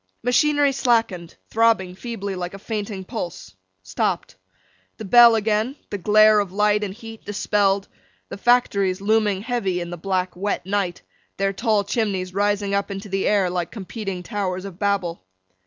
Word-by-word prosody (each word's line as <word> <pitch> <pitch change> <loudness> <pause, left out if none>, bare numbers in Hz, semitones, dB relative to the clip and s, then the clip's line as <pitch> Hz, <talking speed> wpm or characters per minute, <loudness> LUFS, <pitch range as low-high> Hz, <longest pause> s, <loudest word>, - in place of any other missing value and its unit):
Machinery 290 +3 +3
slackened; 225 -10 0 0.2
throbbing 225 -5 +2
feebly 200 -1 -5
like 180 +1 -5
a - - -7
fainting 205 -1 -5
pulse; 165 - -6 0.3
stopped. 95 - -2 0.6
The 220 - -7
bell 235 +3 +7
again; 220 +4 0 0.2
the 205 - -3
glare 215 +3 +5
of 200 -3 -2
light 210 +1 +2
and 200 - -3
heat 225 +2 -11
dispelled; 200 -1 0 0.4
the - - -8
factories, 200 -6 +2
looming 205 -1 +1
heavy 220 -7 -1
in 175 0 -5
the 175 - -5
black 185 +1 -2
wet 200 0 -2
night—their 195 0 -3
tall 215 0 +1
chimneys 195 -4 -2
rising 205 0 0
up 200 +1 0
into 200 +1 -6
the 195 0 -1
air 200 -3 +3
like 175 -1 -2
competing 195 -3 -6
Towers 185 -1 -3
of 190 -2 -9
Babel. 195 - -1
200 Hz, 155 wpm, -22 LUFS, 185-220 Hz, 0.6 s, bell